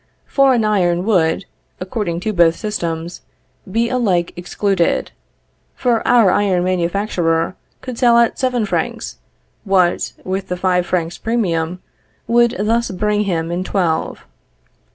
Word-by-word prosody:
Foreign 265 -5 +3
iron 180 -4 +1
would, 180 -4 +1 0.3
according 185 -2 -3
to 215 +4 -2
both 170 -3 +4
systems, 170 -5 -4 0.5
be 230 +3 +1
alike 200 -9 0
excluded; 180 0 0 0.6
for 240 -3 +1
our 235 -6 +5
iron 190 -3 +1
manufacturer 175 -2 0 0.3
could 255 -3 -7
sell 240 -2 +5
at 235 -1 +2
seven 250 -4 0
francs, - - -3 0.5
what, 185 -4 +1
with 190 +1 -3
the 180 - -3
five 180 -1 +1
francs 170 -2 -2
premium, 180 -6 -1 0.4
would 235 0 +3
thus 230 +3 0
bring 210 +2 0
him 165 -3 -1
in 175 +2 -2
twelve. 175 -4 -1
190 Hz, 125 wpm, -18 LUFS, 175-225 Hz, 0.6 s, our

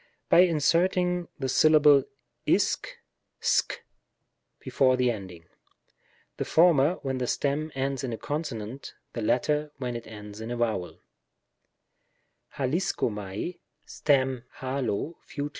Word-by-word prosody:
By - - +6
inserting 180 +1 +3
the 135 - -2
syllable 150 0 +5 0.4
laxy - - +1 0.5
a^^ - - +2 0.8
before 130 -1 +2
the 125 -1 +2
ending; 95 -6 -8 0.9
the - - -1
former 165 -1 +4
when 130 -2 -2
the 125 - -1
stem 150 +4 -1
ends 135 0 -2
in 130 - -3
a 115 - -4
consonant, 135 -5 -5 0.2
the 120 - -4
latter 150 +7 +1
when 125 -3 -4
it 115 - -7
ends 105 -1 -10
in 110 - -6
a 120 - -3
vowel: 110 -7 -2 1.6
akicxofiUL^ 130 - -2 0.3
{aXo)^ 130 -4 +1 0.8
Fut. 145 0 -5
135 Hz, 110 wpm, -27 LUFS, 120-155 Hz, 1.6 s, By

